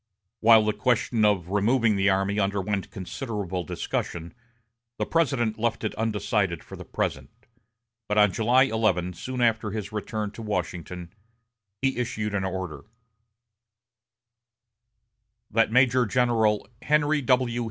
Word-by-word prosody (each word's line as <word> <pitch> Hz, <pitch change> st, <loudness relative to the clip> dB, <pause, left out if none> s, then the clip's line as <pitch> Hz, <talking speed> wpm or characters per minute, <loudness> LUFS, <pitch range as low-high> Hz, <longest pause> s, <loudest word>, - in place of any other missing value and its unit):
While 110 Hz, -1 st, +6 dB
the 105 Hz, -, +1 dB
question 115 Hz, +1 st, +1 dB
of 95 Hz, -4 st, +1 dB
removing 110 Hz, +2 st, +2 dB
the 100 Hz, +1 st, +3 dB
army 100 Hz, +2 st, +1 dB
underwent 100 Hz, 0 st, -1 dB
considerable 95 Hz, -2 st, -4 dB
discussion, 85 Hz, +1 st, -4 dB, 0.6 s
the -, -, -1 dB
President 125 Hz, -9 st, 0 dB
left 115 Hz, 0 st, -1 dB
it 110 Hz, -, -2 dB
undecided 105 Hz, -5 st, -1 dB
for -, -, -10 dB
the -, -, -9 dB
present; -, -, -3 dB, 0.8 s
but 105 Hz, -, -1 dB
on 105 Hz, -1 st, +5 dB
July 120 Hz, +3 st, +4 dB
11, 110 Hz, -8 st, 0 dB
soon 125 Hz, +8 st, -5 dB
after 115 Hz, -2 st, +2 dB
his 105 Hz, 0 st, -5 dB
return 105 Hz, 0 st, -3 dB
to 115 Hz, -, -10 dB
Washington, 90 Hz, -4 st, -4 dB, 0.7 s
he 135 Hz, -2 st, +1 dB
issued 105 Hz, -3 st, -2 dB
an 100 Hz, -1 st, 0 dB
order: 95 Hz, -3 st, -5 dB, 2.7 s
"That 115 Hz, 0 st, +2 dB
Major 125 Hz, 0 st, +4 dB
General 115 Hz, -3 st, +2 dB
Henry 150 Hz, 0 st, +2 dB
W. 125 Hz, -2 st, +1 dB
110 Hz, 125 wpm, -26 LUFS, 100-120 Hz, 2.7 s, While